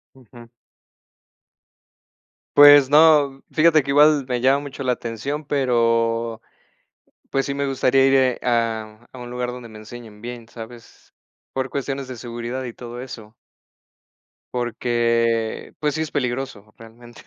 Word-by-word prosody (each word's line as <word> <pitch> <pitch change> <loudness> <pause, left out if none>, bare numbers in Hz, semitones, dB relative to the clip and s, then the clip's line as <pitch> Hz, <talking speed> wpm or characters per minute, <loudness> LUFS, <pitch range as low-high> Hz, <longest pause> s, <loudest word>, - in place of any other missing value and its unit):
Ujú. 120 -2 -16 2.1
Pues 145 -2 +8
no, 145 -2 +4
fíjate 155 -1 +4
que 140 - -5
igual 145 -1 +4
me 125 -1 -1
llama 135 +3 +3
mucho 140 -1 -8
la 125 - +2
atención, 125 +6 -5
pero 115 -4 0 0.9
pues 135 -1 0
sí 140 - -3
me 140 0 -2
gustaría 135 0 +2
ir, 135 - +3
eh, 130 -2 +2
a 115 -1 -2
a 130 - -12
un 120 0 -8
lugar 125 0 -3
donde 125 -1 -9
me 110 - -13
enseñen 110 -1 -12
bien, 120 -1 -8
¿sabes? 115 0 -13 0.4
Por 130 0 -3
cuestiones 135 0 -4
de 130 - -7
seguridad 120 +2 -6
y 125 - -6
todo 120 +1 -9
eso. 110 -4 -10 1.2
Porque 115 -1 -1
pues 150 -1 -1
sí, 160 - -1
es 155 - -6
peligroso 125 -6 -4
realmente, 115 +1 -15
125 Hz, 140 wpm, -21 LUFS, 115-135 Hz, 2.1 s, Pues